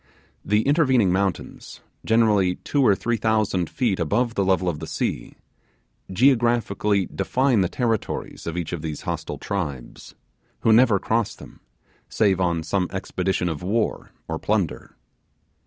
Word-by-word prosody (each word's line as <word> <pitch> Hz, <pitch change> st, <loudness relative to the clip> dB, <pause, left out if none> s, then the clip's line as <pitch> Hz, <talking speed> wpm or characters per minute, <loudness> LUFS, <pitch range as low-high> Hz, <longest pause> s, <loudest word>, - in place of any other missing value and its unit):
The 105 Hz, +2 st, +1 dB
intervening 130 Hz, -, +3 dB
mountains 95 Hz, 0 st, -3 dB, 0.2 s
generally 105 Hz, -5 st, +3 dB
two 145 Hz, -, -1 dB
or 105 Hz, -6 st, +5 dB
three 120 Hz, +4 st, -1 dB
thousand 110 Hz, -5 st, 0 dB
feet 115 Hz, -8 st, -1 dB
above 115 Hz, +9 st, 0 dB
the 100 Hz, -, 0 dB
level 95 Hz, -1 st, +1 dB
of 80 Hz, -4 st, -1 dB
the -, -, -7 dB
sea -, -, -3 dB, 0.8 s
geographically 115 Hz, -4 st, +2 dB
define 125 Hz, +6 st, +1 dB
the 90 Hz, -, +1 dB
territories 115 Hz, -8 st, -3 dB
of 85 Hz, +1 st, -3 dB
each 85 Hz, -1 st, -4 dB
of 85 Hz, -, -4 dB
these 75 Hz, -2 st, -5 dB
hostile -, -, -4 dB
tribes, 75 Hz, -11 st, -5 dB, 0.5 s
who 110 Hz, -, +4 dB
never 115 Hz, -2 st, +5 dB
cross 110 Hz, +2 st, -1 dB
them, -, -, -14 dB, 0.5 s
save 95 Hz, -3 st, +2 dB
on 85 Hz, -2 st, 0 dB
some 90 Hz, +2 st, 0 dB
expedition 95 Hz, -1 st, -2 dB
of 80 Hz, -4 st, -3 dB
war 105 Hz, +5 st, -1 dB, 0.2 s
or -, -, -3 dB
plunder. -, -, -2 dB
100 Hz, 140 wpm, -23 LUFS, 90-115 Hz, 0.8 s, or